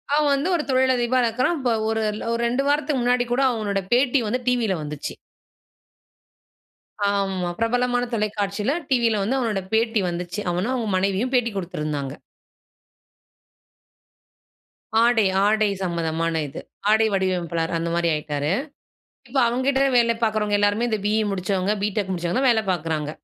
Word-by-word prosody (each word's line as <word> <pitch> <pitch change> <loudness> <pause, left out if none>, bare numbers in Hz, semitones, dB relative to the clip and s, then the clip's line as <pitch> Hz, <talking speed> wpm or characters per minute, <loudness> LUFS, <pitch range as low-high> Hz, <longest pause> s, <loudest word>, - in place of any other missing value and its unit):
அவன் 300 -1 +3
வந்து 285 +6 -1
ஒரு 320 - -1
தொழிலதிபரா 255 -1 +2
இருக்கிறான், 255 +9 0
இப்போ 250 -2 0 0.2
ஒரு, 225 0 0 0.3
ஒரு 230 - -1
2 250 +3 0
வாரத்துக்கு 290 -2 +1
முன்னாடி 245 0 +2
கூட 255 - +1
அவனுடைய 205 -3 -2
பேட்டி 255 +2 +3
வந்து 250 +4 -1
டிவில 235 -6 +1
வந்துச்சு. 150 -1 -5 1.9
ஆமா, 195 -3 -1
பிரபலமான 245 +1 +1
தொலைக்காட்சியில 210 +3 -1
டிவில 235 -5 +2
வந்து 260 +6 0
அவனுடைய 210 -6 -1
பேட்டி 225 -1 +2
வந்துச்சு, 175 +3 -4
அவனும் 190 +9 -1
அவன் 225 -5 -2
மனைவியும் 195 +7 0
பேட்டி 235 -2 +2
கொடுத்திருந்தாங்க. 150 -6 -3 2.9
ஆடை, 235 -3 +4 0.2
ஆடை 215 0 +3
சம்மதமான 165 -2 -1
இது, 135 - -8 0.3
ஆடை 220 +1 +4
வடிவமைப்பாளர் 175 -3 -1
அந்த 165 0 -2
மாரி 170 -1 +1
ஆயிட்டாரு, 150 0 -2 0.8
இப்போ 265 +3 0
அவங்க 245 +3 -1
கிட்ட 270 -1 +2 0.2
வேலை 235 -1 +4
பார்க்கிறவங்க 215 -2 +1
எல்லாருமே 205 +4 +2
இந்த 215 -2 -1
பி.இ 215 +1 +2
முடிச்சவங்க, 190 +1 -1
பிடெக் 205 -1 -1
முடிச்சவங்க 175 +4 -1
தான் 265 -1 +3
வேலை 220 -1 +1
பார்க்கிறாங்க. 155 -3 -2
215 Hz, 135 wpm, -23 LUFS, 185-245 Hz, 2.9 s, ஆடை